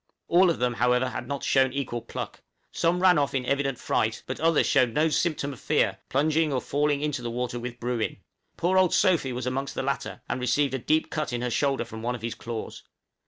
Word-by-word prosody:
All 180 +1 +5
of 170 - 0
them, 125 0 0
however, 125 +2 +2
had - - -6
not 140 -1 -4
shown 130 -1 +3
equal 125 -4 -3
pluck; - - -7 0.3
some 175 +2 +1
ran 180 -4 +6
off 140 -1 0
in 130 -2 -1
evident 135 -1 0
fright, 110 -2 -1
but 130 - -5
others 165 -1 +3
showed 125 -5 +2
no 155 +2 +3
symptom 150 -3 0
of 125 - -12
fear, - - +1
plunging 155 +3 +2
or 130 - +1
falling 145 +2 0
into 150 -4 -2
the 120 - -3
water 120 0 -3
with 120 0 -6
Bruin. 120 -2 -2 0.4
Poor 185 +2 +3
old 185 -2 +3
Sophy 170 -9 +3
was 125 0 -4
amongst 135 +2 -2
the - - -2
latter, 140 +1 -3
and 130 - -2
received 130 +2 +1
a 135 - -1
deep 155 +6 +1
cut 155 -4 -2
in 120 0 -2
the 125 0 -2
shoulder 135 -1 +1
from 110 -1 -8
one 120 +2 -1
of 115 - -10
his 115 -1 -2
claws. 115 -2 -6
135 Hz, 225 wpm, -26 LUFS, 125-150 Hz, 0.4 s, ran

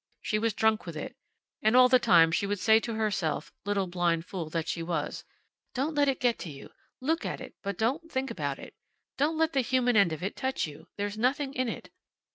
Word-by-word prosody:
She 215 - -1
was 225 -1 0
drunk 220 -3 +2
with 165 -2 -5
it. - - -6 0.5
And 220 +2 +3
all 255 0 +8
the 255 0 +5
time 165 -9 +5
she 200 +4 0
would 205 +1 -1
say 220 +2 +5
to 230 0 -4
herself, 205 -7 -1
little 205 -1 +1
blind 175 -2 0
fool 175 -5 -5
that 165 0 -2
she 170 - -2
was: 165 -3 -3 0.5
"Don't 280 +5 0
let 290 -1 +3
it 270 - +1
get 245 -2 +1
you. 145 -5 -9 0.3
Look 320 +6 0
at - - -3
it, - - -9
but 200 -2 -4
don't 285 +9 -1
think 265 +1 -2
about - - -3
it. - - -11 0.5
Don't 310 +3 +2
let 320 0 +2
the 270 - +3
human 250 -1 +2
end 200 -5 +5
of 160 +1 -5
it 195 - -3
touch 265 0 -1
you. 150 0 -11
There's 205 +1 -3
nothing 270 +3 +1
in 255 -3 -1
it." - - -7
220 Hz, 225 wpm, -29 LUFS, 175-260 Hz, 0.5 s, all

